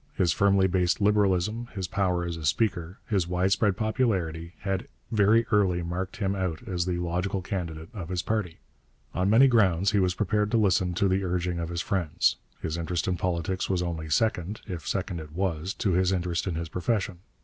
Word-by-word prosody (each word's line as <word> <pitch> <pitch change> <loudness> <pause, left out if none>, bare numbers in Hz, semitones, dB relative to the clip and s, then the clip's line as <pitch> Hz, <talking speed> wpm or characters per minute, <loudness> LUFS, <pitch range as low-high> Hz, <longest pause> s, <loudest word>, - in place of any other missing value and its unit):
His 85 -4 +2
firmly 100 -1 +4
based 90 -1 +1
Liberalism, 105 +2 +2
his 95 -3 -2
power 90 -2 0
as 85 -1 -3
a 80 - -8
speaker, 90 +1 0
his 95 -7 +1
widespread 95 +2 +2
popularity, 95 -8 -1
had 95 -2 -2 0.2
very 110 +2 +4
early 95 -4 +3
marked 95 +5 -4
him 100 -3 0
out 95 +3 -3
as 90 -3 -1
the 90 -1 0
logical 90 +2 -2
candidate 85 -5 -4
of 95 -7 -6
his 90 -1 -1
party. 105 -7 -2 0.6
On 90 +2 +1
many 120 +6 +7
grounds 100 -5 +3
he 105 - +2
was 90 -1 +1
prepared 105 0 +1
to 115 - +2
listen 95 -4 +2
to 100 - +2
the 95 +1 +1
urging 90 -1 -1
of 85 -1 -3
his 85 -1 -2
friends. 85 -3 +1 0.3
His 80 +1 -2
interest 85 +1 -2
in 90 - +1
politics 90 +1 -2
was 90 -2 +1
only 80 -2 -4
second, 100 +3 0
if 90 -6 -6
second 85 - -2
it 75 -1 -10
was, 90 -1 -1
to 100 - 0
his 90 +1 +2
interest 90 -1 -1
in 90 - -1
his 85 0 -3
profession. 95 +1 -1
90 Hz, 195 wpm, -27 LUFS, 85-100 Hz, 0.6 s, many